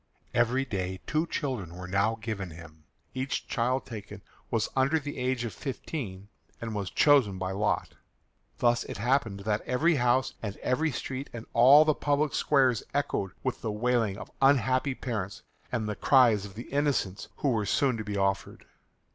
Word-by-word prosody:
Every 125 +3 +2
day 95 -5 -3
two 155 +2 0
children 120 - -3
were 90 0 -7
now 100 +4 +1
given 110 -5 -4
him. 80 -2 -13 0.3
Each 130 +2 -3
child 125 +2 0
taken 105 -3 -9 0.3
was 115 -3 0
under 135 +4 +3
the 145 -2 -5
age 125 -1 0
of 115 - -5
fifteen, 115 -8 -5 0.3
and 115 -1 -5
was 100 -3 -3
chosen 135 -10 +4
by 95 0 -3
lot. 105 +2 0 0.7
Thus 120 -1 +2
it - - -6
happened 115 -3 0
that 105 +1 0
every 150 +6 +2
house 125 +1 +2
and 100 -3 -5
every 155 +5 0
street 135 +2 -5
and 115 -1 -7
all 135 +6 +8
the 155 - +4
public 145 0 0
squares 130 -6 +3
echoed 100 -9 -1
with - - -2
the 110 - -2
wailing 110 -2 +1
of - - -9
unhappy 130 0 +3
parents 110 -4 -4 0.3
and 115 -4 -1
the 105 - -2
cries 115 -7 +4
of 100 -1 -11
the 120 - -9
innocents 140 -9 0
who 140 - 0
were 110 -5 0
soon 135 -4 +2
to 110 - -4
be 105 -1 -4
offered. 95 0 -1
120 Hz, 170 wpm, -28 LUFS, 100-135 Hz, 0.7 s, all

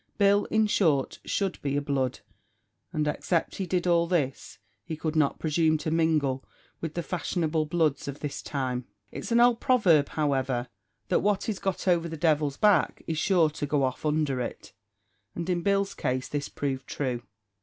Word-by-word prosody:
Bill, 200 0 +4
in 220 0 +2
short, 160 -10 +1
should 195 -2 -1
be 140 0 -1
a - - +1
blood, 135 -3 -1 0.7
and 155 -3 -1
except 165 +3 -1
he 190 - -3
did 180 0 0
all 170 -1 +3
this, 150 -7 -1 0.3
he 160 +6 -5
could 160 0 -3
not 150 -3 +2
presume 155 0 +2
to 155 +1 -3
mingle 155 -5 +1 0.4
with 165 -2 -5
the 170 - -2
fashionable 160 -3 -1
bloods 155 -4 0
of 140 +1 -6
his 145 - -3
time. 130 -3 -3 0.3
It's - - -6
an 235 - +4
old 240 -1 +5
proverb, 180 - +4
however, 130 -5 0 0.4
that - - +3
"what 205 -1 0
is 210 -4 -2
got 195 0 -3
over 170 -2 +2
the 160 - -6
devil's 150 -3 +1
back 210 -3 +3
is 160 -1 -2
sure 170 -5 +3
to 145 -1 -4
go 145 -1 +1
off 130 -1 -2
under 150 -3 +1
it;" 120 - -6 0.6
and 170 0 -4
in 175 -2 0
Bill's 200 +1 +1
case 130 0 -2
this 145 -1 -3
proved 135 -2 -3
true. 125 -4 -2
155 Hz, 180 wpm, -27 LUFS, 140-180 Hz, 0.7 s, old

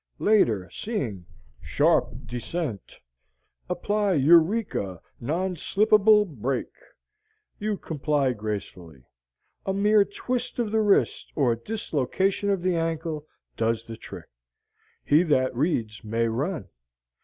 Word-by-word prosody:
Later, 115 - +3
seeing: 115 - -4 0.3
SHARP 125 - +1
DESCENT 120 - -5 0.7
APPLY 205 +2 0
EUREKA 160 - +3 0.2
NON 175 +9 -1
SLIP 210 +7 0
ABLE 210 0 +6
BRAKE 135 - -3 0.9
you 210 -1 -1
comply 145 -5 0
gracefully. 100 - -6 0.6
A 195 - 0
mere 205 +1 +4
twist 245 +5 -4
of 235 -4 -1
the 220 0 +2
wrist 205 -2 +2
or 125 -6 +2
dislocation 190 - -1
of 195 -3 0
the 185 -1 +1
ankle 160 -2 -2 0.3
does 115 0 0
the 115 - -7
trick. 110 - -11 0.8
He 150 +3 +5
that 130 -7 +1
reads 120 -7 -1
may 115 +2 0
run. 135 - -3
155 Hz, 110 wpm, -26 LUFS, -, 0.9 s, ABLE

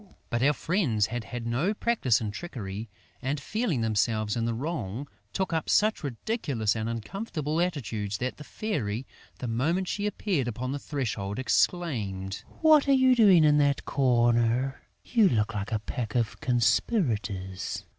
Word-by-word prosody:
But 120 -1 0
our 145 +3 +4
friends 150 - +1
had 115 +1 -4
had 120 -2 -6
no 135 - 0
practice 205 - +2
in 105 -2 -3
trickery 110 - -6 0.3
and, 140 +3 -1
feeling 195 - -1
themselves 110 -1 +1
in 115 -1 0
the 115 - 0
wrong, 130 - -4 0.2
took 190 -3 -2
up 160 -1 -1
such 215 -3 +3
ridiculous 135 - -1
and 110 0 -2
uncomfortable 155 - -3
attitudes 110 - -2
that 130 +1 -3
the 150 - -9
Fairy, 135 - -3 0.3
the 125 - -5
moment 160 +11 0
she 205 +2 -1
appeared 190 - -1
upon 125 +2 -3
the 145 - -3
threshold, 110 -9 -3
exclaimed: 110 - 0 0.2
"What 310 -3 +6
are 275 - +5
you 260 -1 +5
doing 195 -8 +6
in 150 -1 +5
that 140 -1 +2
corner?... 120 0 +2 0.2
You 225 -5 +4
look 110 -1 +1
like 100 0 -4
a 110 - +2
pack 110 +2 -5
of 115 -3 0
conspirators!" 115 - 0
125 Hz, 155 wpm, -28 LUFS, 110-170 Hz, 0.3 s, What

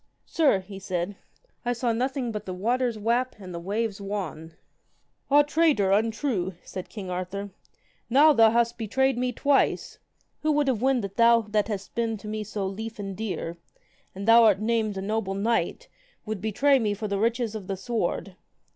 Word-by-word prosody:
Sir, 285 - +2
he 195 +1 -10
said, 185 0 -3 0.5
I 245 -1 0
saw 235 -1 0
nothing 255 +1 -1
but 210 -1 -6
the 185 - -4
waters 240 +4 0
wap 235 +4 0
and 185 -3 -9
the 170 - -4
waves 205 +3 -2
wan. 185 -5 -5 0.8
Ah 290 +1 +6
traitor, 295 -10 +2
untrue, 215 -3 0
said 185 -1 -7
king 195 -4 -7
Arthur, 190 +3 -4 0.6
now 295 +5 +6 0.2
hast 235 +1 +2
thou - - -37
betrayed 265 +4 +1
me 250 +1 -1
twice. 280 +3 +1 0.4
Who 310 0 +2
would 290 -1 +2
have 245 -5 +1
wend 260 -3 +2
that 200 +1 -6
thou 235 0 +6
that 210 -1 +1
hast 200 -3 -5
been 230 -1 -1
to 210 - -11
me 215 0 -3
so 210 -1 -4
lief 220 +4 -5
and 195 -2 -5
dear, 180 -5 -4 0.6
and 195 +2 -6
thou 230 +1 +8
art 205 -3 +4
named 215 -2 0
a 190 - -3
noble 205 -1 -2
knight, 230 - 0
and - - -35
would 215 -3 -4
betray 270 +7 +3
me 210 -3 0
for 215 +1 -4
the 200 -1 -1
riches 230 0 0
of 210 -4 -7
the 195 - -3
sword. 195 -2 -2
220 Hz, 185 wpm, -26 LUFS, 195-240 Hz, 0.8 s, thou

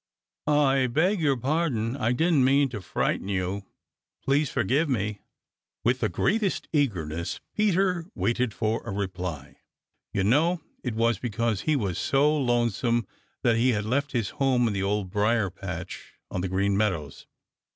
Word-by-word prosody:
"I 135 -3 +3
beg 170 - +1
your 140 -4 +2
pardon. 130 -4 0
I 120 -3 0
didn't 160 +1 +3
mean 135 +1 +4
to 110 -5 -6
frighten 95 - -1
you. 95 0 -2 0.6
Please 140 +1 +2
forgive 145 +5 +1
me." 105 -4 -1 0.6
With 125 +3 +2
the - - +1
greatest 205 -2 0
eagerness 85 - -1 0.2
Peter 190 -4 +1
waited 120 0 0
for 110 +2 -1
a - - -7
reply. 90 -8 -4 0.5
You 100 - 0
know 155 - +2 0.2
it 125 -4 -3
was 115 +1 +2
because 115 -3 -1
he 155 - +1
had 140 - +1
been 95 -3 -1
so 145 - +2
lonesome 120 -3 +1 0.4
that 115 -1 +3
he 125 +2 +3
had 105 -1 -1
left 140 +5 -1
his 115 -5 -1
home 130 -3 +3
in 110 - -1
the 100 - -2
dear 95 - 0
Old 100 -2 -1
Briar 105 -1 +1
patch 90 -2 -7 0.2
on 90 - -2
the 95 - -2
Green 100 +2 +1
Meadows. 95 -9 -2
120 Hz, 160 wpm, -26 LUFS, 100-140 Hz, 0.6 s, mean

